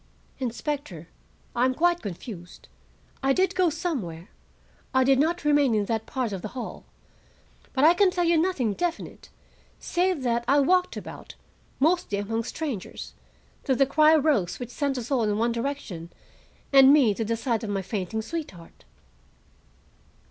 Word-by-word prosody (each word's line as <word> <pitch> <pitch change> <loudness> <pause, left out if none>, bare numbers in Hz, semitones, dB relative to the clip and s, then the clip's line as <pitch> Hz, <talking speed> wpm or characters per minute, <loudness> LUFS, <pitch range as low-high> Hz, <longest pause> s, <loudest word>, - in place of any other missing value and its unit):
"Inspector, 250 - -4 0.5
I 240 - +2
am 255 0 +1
quite 345 +2 +2
confused. 180 -3 -9 0.5
I 270 0 +3
did 375 +4 +1
go 365 -3 +3
somewhere; 245 - -4 0.7
I 260 - +5
did 265 0 +4
not 330 +3 0
remain 290 -5 +3
in 210 -1 +1
that 225 +1 -2
part 255 -5 -2
of 195 -2 -4
the - - -4
hall. 245 - -6 0.9
But 265 - 0
I 325 +3 +8
can 390 +1 +4
tell 360 -1 -1
you 340 0 +3
nothing 300 - 0
definite, 345 - -4 0.5
save 355 -4 -1
that 235 -1 0
I 285 +1 +4
walked 360 +5 +2
about, - - -9 0.4
mostly 315 - +1
among 225 +3 -2
strangers, 270 - -5 0.5
till 265 - +1
the 275 - +4
cry 305 +3 +5
rose 275 - +1
which 245 -1 -6
sent 280 0 -1
us 245 +2 -6
all 260 -3 +2
in 210 -2 0
one 230 +2 +1
direction 230 -9 -4 0.6
and 270 0 +8
me 270 -8 +5
to 225 - -3
the 230 +1 -1
side 230 -2 -1
of 215 - -4
my 195 -1 -2
fainting 205 +2 -3
sweetheart." 220 - -8
260 Hz, 160 wpm, -26 LUFS, 220-310 Hz, 0.9 s, I